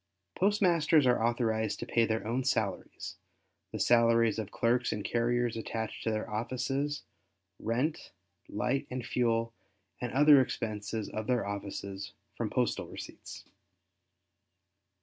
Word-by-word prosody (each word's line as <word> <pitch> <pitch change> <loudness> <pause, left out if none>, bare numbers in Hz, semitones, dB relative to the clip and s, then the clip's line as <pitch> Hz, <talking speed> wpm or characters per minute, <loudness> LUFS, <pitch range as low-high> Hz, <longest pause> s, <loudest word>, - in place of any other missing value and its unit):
—Postmasters 170 -7 +3
are 125 -3 +3
authorized 110 -2 +1
to - - -4
pay 115 -1 +2
their 110 -1 -1
own 120 +4 0
salaries, 110 -7 -2 0.5
the - - -4
salaries 115 -2 +4
of 110 - -4
clerks 120 +1 +1
and 105 -2 -3
carriers 120 0 +1
attached 110 0 -4
to - - 0
their 110 -1 -2
offices, 130 +6 -2 0.6
rent, 125 +8 -1 0.4
light, 125 +2 -1
and 125 -2 -4
fuel, 115 -1 +1 0.5
and 120 -1 -2
other 145 +1 +7
expenses 110 -3 -3
of 110 0 -5
their 125 -4 +1
offices 100 -1 -5 0.2
from - - -2
postal - - 0
receipts. - - -9
115 Hz, 125 wpm, -31 LUFS, 110-130 Hz, 0.6 s, other